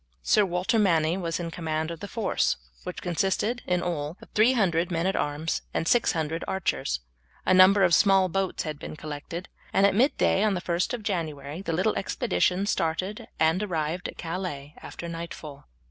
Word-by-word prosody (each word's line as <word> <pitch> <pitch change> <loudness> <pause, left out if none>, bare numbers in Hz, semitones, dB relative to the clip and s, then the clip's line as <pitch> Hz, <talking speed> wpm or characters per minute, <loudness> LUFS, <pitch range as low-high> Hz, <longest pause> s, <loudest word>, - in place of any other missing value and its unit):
Sir 210 -2 +4
Walter 180 +6 +1
Manny 165 -5 +3
was 170 -2 -2
in 170 -1 -4
command 160 -1 -2
of 165 - -7
the 205 - -6
force, 220 - 0 0.3
which - - -6
consisted 195 +7 0
in 180 -1 +1
all 160 -1 -3
of - - -15
300 200 -7 +3
men 170 -1 -1
at 190 - +1
arms 150 +2 -1
and 165 - 0
600 165 -8 +1
archers. 60 - -1 0.4
A 185 - +4
number 190 +2 +7
of 175 -2 +4
small 195 -1 +5
boats 190 +1 -1
had 155 -2 -5
been - - -7
collected, 155 +4 -6 0.2
and 195 - +4
at 200 - +4
midday 230 -3 +3
on 210 -2 +2
the - - -1
1st 175 +7 0
of 230 - -9
January 160 -5 -3
the 195 - -3
little 185 +6 +1
expedition 195 -3 0
started, 185 +1 -1
and 160 +4 +3
arrived 170 -3 -2
at - - -9
Calais 165 -5 -5
after 170 - -7
nightfall. 165 -4 -7
175 Hz, 175 wpm, -27 LUFS, 160-195 Hz, 0.4 s, number